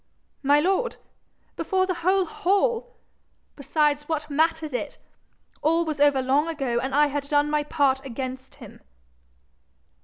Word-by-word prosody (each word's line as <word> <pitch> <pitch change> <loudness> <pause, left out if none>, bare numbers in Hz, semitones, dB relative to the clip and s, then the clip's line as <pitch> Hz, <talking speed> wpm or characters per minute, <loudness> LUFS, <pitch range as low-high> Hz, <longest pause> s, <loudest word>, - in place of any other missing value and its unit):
'My 285 +1 +4
lord! 390 +9 0 0.6
Before 375 -1 0
the 370 - -1
whole 375 +2 +2
hall? 460 +8 0 0.6
Besides, 295 +1 0
what 305 -2 -3
mattered 315 0 0
it? 245 - -4 0.6
All 330 +2 +2
was 305 -2 -4
over 285 -2 +4
long 280 +4 +2
ago, 270 -7 -1
and 265 +2 -3
I 295 +1 +5
had 290 -1 -3
done 295 0 +2
my 300 0 +2
part 280 -3 +1
against 260 0 -6
him.' - - -13
295 Hz, 140 wpm, -25 LUFS, 275-330 Hz, 0.6 s, I